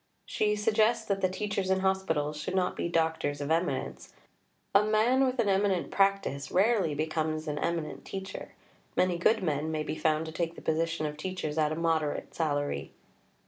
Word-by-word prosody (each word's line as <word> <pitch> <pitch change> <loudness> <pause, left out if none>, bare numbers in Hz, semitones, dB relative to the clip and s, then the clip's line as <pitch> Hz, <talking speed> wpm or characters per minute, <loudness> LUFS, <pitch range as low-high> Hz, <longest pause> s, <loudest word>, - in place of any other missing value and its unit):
She 210 0 +1
suggests 215 +2 +2
that 195 -1 -1
the 185 - +3
teachers 200 0 -2
in 190 0 +2
hospitals 175 -6 0
should 155 +5 -4
not 180 -1 +1
be - - -2
doctors 160 -3 0
of 145 +1 -3
eminence; 170 +2 -2 0.6
"a 200 - +7
man 220 +5 +3
with 255 +1 -2
an 230 - +2
eminent 195 -2 +1
practice 195 -9 +1
rarely 195 -5 +2
becomes 155 +1 -1
an 150 -1 -2
eminent 165 -2 -2
teacher; 190 0 -7 0.4
many 180 -1 +2
good 200 +3 +3
men 155 -2 0
may 155 -1 -1
be - - -3
found 155 0 +1
to 160 - -6
take 165 +1 -2
the - - -10
position 165 0 0
of 150 0 -4
teachers 160 -2 -3
at 155 -1 +2
a - - -1
moderate 160 -2 -1
salary." 145 -3 -2
170 Hz, 180 wpm, -29 LUFS, 155-195 Hz, 0.6 s, a